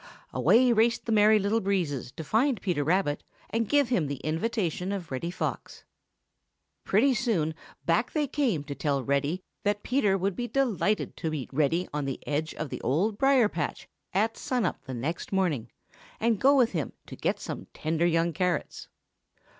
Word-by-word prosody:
Away 245 +1 +5
raced 230 +1 +2
the 230 - -2
Merry 215 0 +6
Little 210 +2 +1
Breezes 170 -11 -1
to 160 - -6
find 230 - +2
Peter 175 -7 0
Rabbit 160 -2 +1 0.3
and 225 -1 0
give 285 -4 +3
him 180 - +1
the 140 -2 -4
invitation 180 +2 -1
of 185 -6 -5
Reddy 130 +6 -2
Fox. 180 - -4 1.0
Pretty 255 +7 +3
soon 195 -10 0 0.3
back - - +2
they 305 -2 +1
came 250 - 0
to 145 -1 -5
tell 140 -2 -1
Reddy 140 +7 0 0.2
that 205 0 0
Peter 240 -6 +2
Rabbit 195 - 0
would 195 -1 +1
be 245 - -3
delighted 220 -6 0
to 160 - -2
meet 145 -4 -5
Reddy 155 +5 +1
on 150 -1 -1
the 135 -1 -3
edge 150 +2 -2
of 155 - -4
the - - -5
Old 200 - 0
Briar 270 -4 +5
patch 165 -7 -4 0.2
at 220 +4 +1
sun 250 -3 -1
up - - -3
the 130 - -5
next 145 +8 -4
morning, 165 - 0 0.5
and 225 -2 +1
go 275 +2 +6
with 245 -3 +4
him 160 -6 -3
to - - -9
get - - -1
some - - -6
tender 165 +2 0
young 165 0 +1
carrots. 180 -3 -2
185 Hz, 180 wpm, -28 LUFS, 155-225 Hz, 1.0 s, Merry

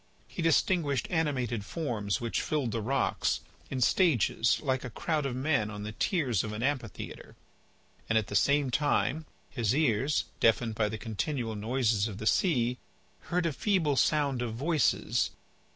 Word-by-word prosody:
He - - -6
distinguished 160 -5 +2
animated 130 - 0
forms 110 -8 -2
which 115 -1 -1
filled 145 -7 -1
the 115 - -2
rocks, 135 +5 0 0.3
in 130 -1 -3
stages, 125 - +3
like 130 -3 0
a 125 - -5
crowd 150 +4 -1
of 125 - -4
men 130 -5 +1
on 105 -1 -6
the 105 - -5
tiers 125 - 0
of 105 -1 -5
an 110 +2 -4
amphitheatre. 130 -7 -4 0.7
And 115 - +3
at 110 - +2
the 100 - -6
same 140 +5 +3
time, 150 +2 +1 0.2
his 120 -2 0
ears, 140 -1 +2 0.2
deafened 115 0 +3
by 110 -1 0
the 110 - -4
continual 115 +2 -3
noises 110 -1 +1
of 100 -3 -7
the 110 - -6
sea, 125 - +2 0.5
heard 180 0 +1
a 165 - 0
feeble 165 - +1
sound 140 -2 +2
of 115 -2 -3
voices. 150 +2 +1
125 Hz, 160 wpm, -29 LUFS, 110-150 Hz, 0.7 s, stages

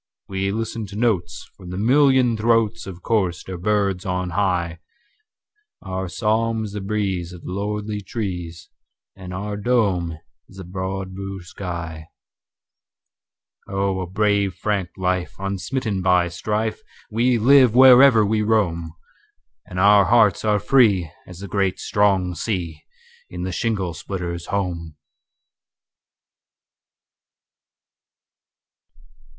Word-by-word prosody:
We 95 0 -2
listen 110 0 -4
to 100 - -10
notes 100 -6 -1
from 90 -3 -12
the 90 - -5
million 130 +1 +4
throatsOf 110 -5 0
chorister 95 -4 -1
birds 100 0 0
on 90 -2 -2
high, 90 -3 -1 1.0
Our 95 -1 -4
psalm 110 +2 0
is 105 - -5
the 105 0 -5
breeze 95 -4 -2
in 90 - -11
the - - -5
lordly 105 +2 -3
trees, 90 -5 -5 0.5
And 95 -1 -9
our 100 +3 -4
dome 100 -8 0 0.3
is 95 - -16
the 95 - -7
broad 95 +1 -5
blue 95 -1 -6
sky, 85 -4 -6 1.6
Oh! 95 -1 -1
a 90 - -4
brave 100 0 +1
frank 100 -4 -2
life, 90 -1 -1
unsmitten 100 +2 -3
by 90 -1 +3
strife, 105 +5 -2 0.3
We 120 +3 +2
live 125 0 +5
wherever 130 -3 +8
we 110 +1 +1
roam, 85 -7 0 0.7
And 90 - -5
our 100 0 +6
hearts 110 -5 +4
are 105 -1 +2
free 100 - +3 0.2
as 90 0 -11
the 100 - -6
great 95 0 0
strong 95 -3 +1
sea, 85 -6 -3 0.5
In 90 0 -6
the 95 - -3
shingle 95 -4 -1
splitter's 85 -2 -5
home. 85 -5 -3
100 Hz, 115 wpm, -22 LUFS, 90-110 Hz, 1.6 s, wherever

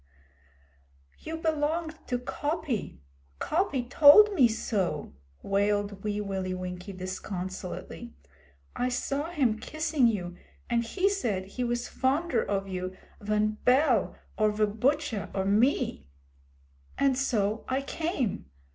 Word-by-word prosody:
'You 320 +1 -5
belonged 315 0 -1
to 250 - 0
Coppy. 285 - -3 0.4
Coppy 305 -7 0
told 300 - +8
me 270 -10 +6
so!' 195 - -2 0.3
wailed 200 0 0
Wee 210 -1 -1
Willie 190 -2 -3
Winkie 180 +1 -6
disconsolately. 185 0 -6 0.6
'I 250 - 0
saw 275 +5 -2
him 255 -10 +1
kissing 310 0 +1
you, 180 -6 -2 0.4
and 235 0 +2
he 365 +12 0
said 230 - -1
he 245 +6 -4
was 240 0 -1
fonder 295 +6 +1
of 195 -1 -2
you 185 0 -4 0.2
van 215 +1 0
Bell 255 -4 +3 0.2
or 215 0 +4
ve 210 0 +2
Butcha 245 +2 0
or 190 -1 0
me. 205 - +1 0.9
And 275 -1 +3
so 220 -5 0
I 265 +1 -1
came. 275 - -2
230 Hz, 120 wpm, -28 LUFS, 200-290 Hz, 0.9 s, told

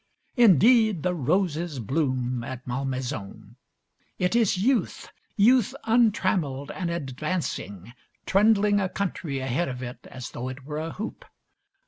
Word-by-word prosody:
Indeed, 220 - +5
the 180 0 +1
roses 170 0 0
bloom 130 -1 -1
at 130 +1 -7
Malmaison. 125 -4 -4 0.6
It 180 +4 0
is 225 -5 +3
youth, 240 +6 0 0.3
youth 245 +3 +4
untrammeled 185 - +1
and 180 -2 -3
advancing, 135 - -4 0.3
trundling 205 0 +4
a 190 -2 -1
country 180 -7 -3
ahead 135 +4 -1
of 125 0 -6
it 125 +1 -8
as 130 -2 -8
though 125 +2 -5
it 130 +1 -9
were 150 +1 -4
a 160 +1 -4
hoop. 215 +3 -6
160 Hz, 125 wpm, -26 LUFS, 130-200 Hz, 0.6 s, Indeed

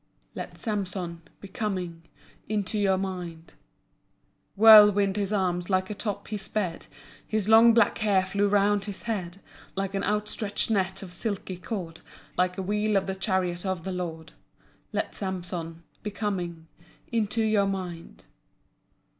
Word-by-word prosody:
Let - - -7
Samson 185 -6 -3 0.2
Be 200 - -8
coming 185 -5 -3 0.5
Into 210 0 -1
your 195 -2 +3
mind. 180 -4 -5 1.0
Whirling 210 -2 +8
his 200 0 -2
arms, 180 -3 0
like 185 +1 +1
a - - -1
top 205 -1 -4
he 215 - -2
sped. 195 -3 -3 0.4
His 215 -2 -1
long 225 +1 +7
black 230 -3 +4
hair 200 -3 +3
flew 200 +2 +1
round 205 0 +2
his 205 -2 -6
head 195 -6 -3 0.4
Like 195 0 -2
an 195 0 -1
outstretched 210 +1 -1
net 190 -2 0
of 180 -2 -9
silky 190 -1 -3
cord, 175 -3 -5 0.4
Like 180 +1 +1
a 190 - -2
wheel 210 +1 +1
of 195 - +1
the 190 - -2
chariot 185 -2 -1
of 190 -4 -2
the 190 - -3
Lord. 170 -3 -5 0.6
Let - - -2
Samson 175 -3 -5 0.2
Be 210 - -3
coming 180 -6 -3 0.5
Into 225 0 +1
your 215 -2 +3
mind. 175 - -5
195 Hz, 145 wpm, -27 LUFS, 180-210 Hz, 1.0 s, Whirling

